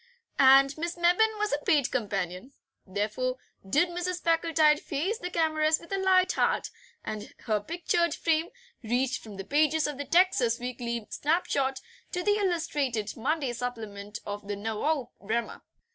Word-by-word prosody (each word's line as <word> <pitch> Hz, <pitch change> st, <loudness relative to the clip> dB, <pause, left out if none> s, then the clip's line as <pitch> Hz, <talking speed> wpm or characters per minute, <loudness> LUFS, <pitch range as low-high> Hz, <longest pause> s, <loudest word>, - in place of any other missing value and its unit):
And 275 Hz, +1 st, +7 dB
Miss 340 Hz, +1 st, -3 dB
Mebbin 365 Hz, +6 st, +3 dB
was 420 Hz, -4 st, -1 dB
a 290 Hz, -, -1 dB
paid 300 Hz, -9 st, +2 dB
companion. 200 Hz, 0 st, -3 dB, 0.3 s
Therefore 215 Hz, +6 st, -2 dB, 0.3 s
did 295 Hz, -, +2 dB
Mrs. 355 Hz, +1 st, -3 dB
Packletide 325 Hz, -2 st, +3 dB
face 370 Hz, +11 st, -2 dB
the 360 Hz, -, -4 dB
cameras 315 Hz, -2 st, +2 dB
with 335 Hz, -, -15 dB
a 390 Hz, -, 0 dB
light 375 Hz, -1 st, +4 dB
heart, -, -, 0 dB, 0.3 s
and 215 Hz, -1 st, -6 dB
her 215 Hz, -2 st, 0 dB
pictured 340 Hz, -, 0 dB
fame 325 Hz, 0 st, +1 dB, 0.3 s
reached 250 Hz, +3 st, 0 dB
from 210 Hz, -3 st, -10 dB
the 195 Hz, -, -5 dB
pages 310 Hz, +3 st, +2 dB
of 295 Hz, -2 st, -4 dB
the 285 Hz, -, -3 dB
TEXAS 275 Hz, -10 st, +3 dB
WEEKLY 235 Hz, -2 st, -4 dB
SNAPSHOT 280 Hz, -4 st, 0 dB, 0.3 s
to 360 Hz, -1 st, -1 dB
the 415 Hz, +1 st, +3 dB
illustrated 295 Hz, -, -1 dB
Monday 275 Hz, +1 st, -1 dB
supplement 220 Hz, -4 st, -5 dB
of 205 Hz, 0 st, -6 dB
the 205 Hz, -, -2 dB
NOVOE 225 Hz, +7 st, -2 dB
VREMYA. 225 Hz, +3 st, -2 dB
285 Hz, 150 wpm, -28 LUFS, 230-340 Hz, 0.3 s, And